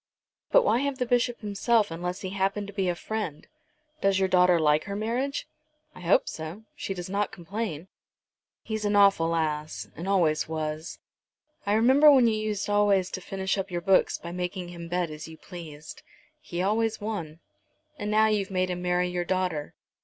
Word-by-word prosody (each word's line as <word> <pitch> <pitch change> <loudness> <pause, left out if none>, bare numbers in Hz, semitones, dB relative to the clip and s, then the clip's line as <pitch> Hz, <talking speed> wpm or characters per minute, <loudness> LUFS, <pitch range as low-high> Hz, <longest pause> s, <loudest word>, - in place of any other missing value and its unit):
"But - - +6
why 240 - +3
have 280 0 -1
the 250 - 0
Bishop 245 0 +1
himself 210 0 +1
unless 180 +2 -4
he 185 - -4
happen 195 +1 -1
to 200 - -9
be 190 -2 0
a 175 - 0
friend? 195 -6 -4 0.6
Does 195 -1 +3
your 190 0 +2
daughter 180 -1 +5
like 150 -1 +3
her 200 - -4
marriage?" 245 +7 -2 0.5
"I - - -13
hope 175 +2 +3
so. 160 +7 -6
She 195 - -4
does 175 -1 -5
not 200 +1 -1
complain." 185 -2 -5 0.8
"He's 220 -1 -3
an 205 0 +1
awful 195 -5 +4
ass, 150 -9 -2
and 170 +4 -6
always 160 -6 +2
was. 155 0 -4 0.7
I 205 - +3
remember 260 +7 +6
when 260 -4 +6
you 225 - +3
used 215 -1 -2
always 205 -3 +3
to 185 - -5
finish 190 +1 -2
up 195 +1 -3
your 175 -1 -3
books 190 +1 +3
by 170 - -8
making 180 0 -4
him 170 -1 -8
bet 175 -1 -1
as 155 +1 -8
you 160 0 -11
pleased." 155 -5 -10 0.4
"He 175 +1 -4
always 220 +2 +1
won." 175 -7 -5 0.6
"And 205 - -3
now 215 +1 +4
you've 210 -3 +1
made 185 -1 0
him 180 0 -4
marry 180 0 +1
your 180 0 -2
daughter. 180 -5 -2
190 Hz, 185 wpm, -27 LUFS, 170-210 Hz, 0.8 s, But